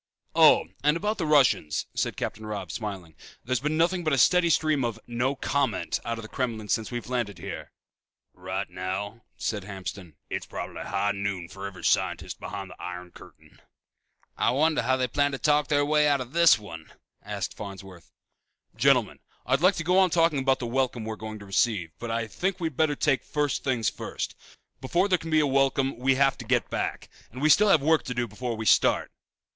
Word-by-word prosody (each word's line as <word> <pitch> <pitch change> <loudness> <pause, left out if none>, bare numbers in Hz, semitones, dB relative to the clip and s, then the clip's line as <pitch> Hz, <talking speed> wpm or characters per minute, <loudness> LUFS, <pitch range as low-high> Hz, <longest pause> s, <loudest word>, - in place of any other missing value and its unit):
"Oh, - - +6 0.2
and 150 +2 +3
about 210 +4 -2
the 165 - -1
Russians," 135 - +3
said - - -2
Captain 110 - -4
Robb, 105 -5 -5
smiling. 95 -7 -6 0.3
"There's 130 0 0
been 150 +3 -1
nothing 175 +2 +2
but 155 -2 +1
a - - +3
steady 180 +5 +4
stream 155 -4 +2
of 115 -2 -2
'no 120 +3 -1
comment' 135 -7 -1
out 115 0 -3
of 115 - -7
the - - -8
Kremlin 110 -4 -3
since 110 - 0
we 120 - -3
landed 120 -6 -3
here." - - -7 0.6
"Right 95 +2 -4
now," 100 +5 -5
said 105 -3 -2
Hamston, 95 -4 -7
"it's - - -4
probably - - -6
high 100 +1 0
noon 100 -4 -3
for 95 +1 -7
every 90 -3 -11
scientist - - 0
behind 100 -2 -6
the - - -13
iron 90 0 -7
curtain." - - -17 0.7
"I - - +2
wonder 155 +4 +2
how 130 0 +1
they 130 -1 0
plan 145 +3 +1
to - - -2
talk 150 +1 +2
their 145 -1 +2
way 150 0 +3
out 145 -1 +3
of 125 +1 -7
this 170 0 +6
one?" 85 -7 -10 0.3
asked - - -5
Farnsworth. 95 -3 -10 0.6
"Gentlemen, - - +3 0.3
I'd 130 +3 +1
like 185 +2 +5
to 170 - -3
go 180 +3 +3
on 190 -1 +5
talking 165 -3 +2
about 135 0 +2
the 125 - -5
welcome 120 -2 -1
we're 110 0 -4
going 110 0 -7
to 100 - -11
receive, 95 -4 0
but 120 - -5
I 115 0 -1
think 185 - -2
we'd 160 -5 -3
better 155 0 +2
take 135 -3 +1
first 145 -1 -1
things 125 -5 0
first. - - -4 0.5
Before 170 +9 +1
there 180 -3 +2
can 165 - -7
be 155 -1 +4
a - - +2
welcome 135 0 +1
we 130 +2 +2
have 135 0 +2
to - - -6
get - - 0
back. - - -3 0.2
And 125 - -9
we 155 +3 +2
still 210 +6 +6
have 155 -7 +5
work 160 +1 +4
to 125 - -4
do 120 0 -1
before 115 +3 -4
we 110 - -4
start." 90 - +3
125 Hz, 205 wpm, -26 LUFS, 105-150 Hz, 0.7 s, Oh